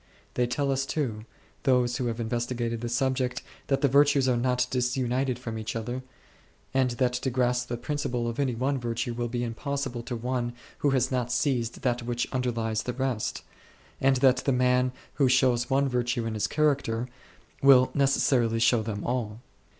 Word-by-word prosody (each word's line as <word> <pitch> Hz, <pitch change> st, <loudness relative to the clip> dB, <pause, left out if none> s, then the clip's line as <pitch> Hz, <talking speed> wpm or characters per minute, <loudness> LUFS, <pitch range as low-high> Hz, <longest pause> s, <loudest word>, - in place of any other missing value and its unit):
They 125 Hz, -1 st, +1 dB
tell 140 Hz, +3 st, 0 dB
us 135 Hz, 0 st, -1 dB
too, 115 Hz, -8 st, -2 dB, 0.4 s
those 125 Hz, -3 st, +2 dB
who 125 Hz, -, -1 dB
have 115 Hz, 0 st, -3 dB
investigated 120 Hz, 0 st, -2 dB
the 120 Hz, -, -3 dB
subject, 130 Hz, +1 st, 0 dB, 0.2 s
that 135 Hz, -, +1 dB
the 140 Hz, -, +4 dB
virtues 140 Hz, 0 st, +4 dB
are 125 Hz, -, +3 dB
not 125 Hz, +1 st, +1 dB
disunited 125 Hz, 0 st, 0 dB
from 115 Hz, -3 st, -5 dB
each 110 Hz, +1 st, -5 dB
other, 120 Hz, +3 st, -3 dB, 0.7 s
and 130 Hz, -1 st, +3 dB
that 125 Hz, -1 st, +2 dB
to 125 Hz, +2 st, -1 dB
grasp 125 Hz, -1 st, 0 dB
the 120 Hz, -, -3 dB
principle 125 Hz, -2 st, -2 dB
of 115 Hz, +2 st, -4 dB
any 130 Hz, -4 st, +1 dB
one 135 Hz, +3 st, 0 dB
virtue 120 Hz, 0 st, -2 dB
will 120 Hz, 0 st, -2 dB
be 120 Hz, +1 st, -2 dB
impossible 130 Hz, +1 st, -3 dB
to 120 Hz, +1 st, -5 dB
one 120 Hz, 0 st, -2 dB, 0.3 s
who 145 Hz, -, +2 dB
has 130 Hz, -2 st, +1 dB
not 125 Hz, -1 st, -1 dB
seized 125 Hz, -4 st, 0 dB
that 120 Hz, -1 st, +1 dB
which 120 Hz, 0 st, -1 dB
underlies 115 Hz, -4 st, -1 dB
the 125 Hz, -, -4 dB
rest, 130 Hz, -4 st, -2 dB, 0.6 s
and 135 Hz, 0 st, +4 dB
that 130 Hz, -1 st, +6 dB
the 135 Hz, -, 0 dB
man 125 Hz, 0 st, +2 dB, 0.3 s
who 135 Hz, -, +5 dB
shows 125 Hz, -2 st, +3 dB
one 140 Hz, +1 st, +2 dB
virtue 125 Hz, -2 st, -1 dB
in 115 Hz, -, -2 dB
his 110 Hz, -, 0 dB
character 140 Hz, -6 st, 0 dB, 0.5 s
will 130 Hz, -2 st, +6 dB
necessarily 130 Hz, -4 st, +2 dB
show 115 Hz, 0 st, +4 dB
them 105 Hz, -2 st, -4 dB
all. 115 Hz, -3 st, -2 dB
125 Hz, 180 wpm, -27 LUFS, 120-130 Hz, 0.7 s, that